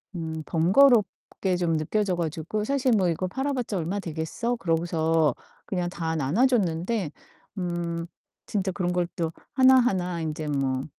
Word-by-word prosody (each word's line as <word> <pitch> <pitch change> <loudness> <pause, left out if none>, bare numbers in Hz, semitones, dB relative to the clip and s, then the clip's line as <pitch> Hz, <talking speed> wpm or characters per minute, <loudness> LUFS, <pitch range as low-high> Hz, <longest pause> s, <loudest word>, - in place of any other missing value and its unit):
음 160 -2 -4
번거롭게 195 +1 +3
좀 165 -2 +1
느껴져 185 +4 0
가지고 165 +5 -2
사실 275 -1 +1
'뭐 190 -4 +3
이거 175 +3 -1
팔아 265 +8 -2
봤자 240 -6 -2
얼마 180 +4 -2
되겠어?' 170 +9 -3
그러고서 165 - +1 0.3
그냥 180 -2 -2
다 165 -2 -3
나눠 155 - +2
줬는데 190 - 0 0.5
음 170 -1 -3 0.4
진짜 195 -2 -1
그런 180 -2 -1
걸 175 -1 +1
또 165 -1 -1 0.2
하나하나 245 -10 +4
인제 155 0 -3
뭐 135 -2 -1
175 Hz, 285 characters per minute, -26 LUFS, 160-210 Hz, 0.5 s, 하나하나